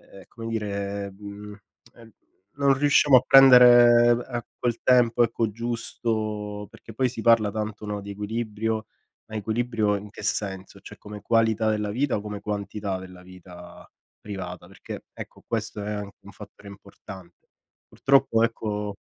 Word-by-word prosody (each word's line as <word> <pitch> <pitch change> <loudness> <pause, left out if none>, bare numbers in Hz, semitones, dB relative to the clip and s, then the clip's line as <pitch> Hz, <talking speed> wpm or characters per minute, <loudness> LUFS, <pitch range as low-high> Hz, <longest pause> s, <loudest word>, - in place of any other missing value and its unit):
ehm, 95 -1 -16
come 115 -1 -9
dire, 100 -2 -4
mhmm, 105 +1 -10 0.4
ehm, 115 -2 -17 0.4
non 140 -1 +3
riusciamo 145 0 +4
a 125 - +4
prendere 120 -3 +7 0.2
a 120 -3 -4
quel 120 -1 -2
tempo, 120 -2 +4
ecco, 115 -1 0
giusto. 110 -2 -4
Perché 115 - -14
poi 130 +1 +1
si 115 -2 -7
parla 115 -3 +4
tanto, 105 0 -5
no, 105 -1 -4
di 100 - -9
equilibrio, 110 +1 -3 0.4
ma 110 - -11
equilibrio 110 0 -1
in 100 +1 -9
che 105 - -11
senso? 95 -2 -4
Cioè - - -13
come 105 -1 -10
qualità 115 -1 +2
della 105 -1 -2
vita 130 +4 0
o - - -3
come 105 -1 -7
quantità 100 -1 -4
della 90 -1 -12
vita 90 -1 -14 0.3
privata? 90 -4 -8
Perché, 95 - -10
ecco, - - -11
questo 110 -2 -4
è 105 - -4
anche 105 -1 -7
un 100 - -14
fattore 100 -1 -13
importante. 95 -3 -13 0.4
Purtroppo 135 -4 +2
ecco 105 -3 -2
105 Hz, 150 wpm, -25 LUFS, 100-115 Hz, 0.4 s, prendere